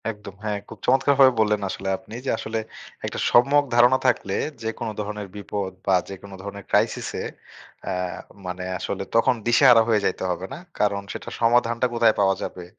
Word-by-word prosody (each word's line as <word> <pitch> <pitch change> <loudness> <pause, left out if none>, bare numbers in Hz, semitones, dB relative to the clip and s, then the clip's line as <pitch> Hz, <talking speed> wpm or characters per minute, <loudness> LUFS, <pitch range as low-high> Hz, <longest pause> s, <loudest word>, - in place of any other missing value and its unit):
একদম। 105 -3 -8
হ্যাঁ, 105 -1 -1
খুব - - -10
চমৎকারভাবে 135 +1 +5
বললেন 105 -1 +2
আসলে 95 - -4
আপনি। 110 - -12
যে - - -1
আসলে 110 +1 -3 0.5
একটা - - -4
সম্যক 140 +4 +5
ধারণা 120 +2 +6
থাকলে 100 -5 +1 0.3
যেকোনো 115 0 -3
ধরনের 105 -1 -4
বিপদ 100 -1 -4 0.2
বা 95 - +5
যেকোনো 95 0 -9
ধরনের 100 0 -7
ক্রাইসিস - - +1
এ - - -4 0.6
অ্যা 95 - -2 0.5
মানে 90 0 -5
আসলে 100 0 -3
তখন 125 +3 +4
দিশাহারা 120 -1 +7
হয়ে 110 -3 +2
যাইতে 95 - -1
হবে 90 +1 -4
না। - - -6 0.2
কারণ 100 -1 +1
সেটা - - -7
সমাধানটা 120 +1 +3
কোথায় 115 -2 +4
পাওয়া 95 -1 +3
যাবে 90 - -6
105 Hz, 170 wpm, -24 LUFS, 100-120 Hz, 0.6 s, দিশাহারা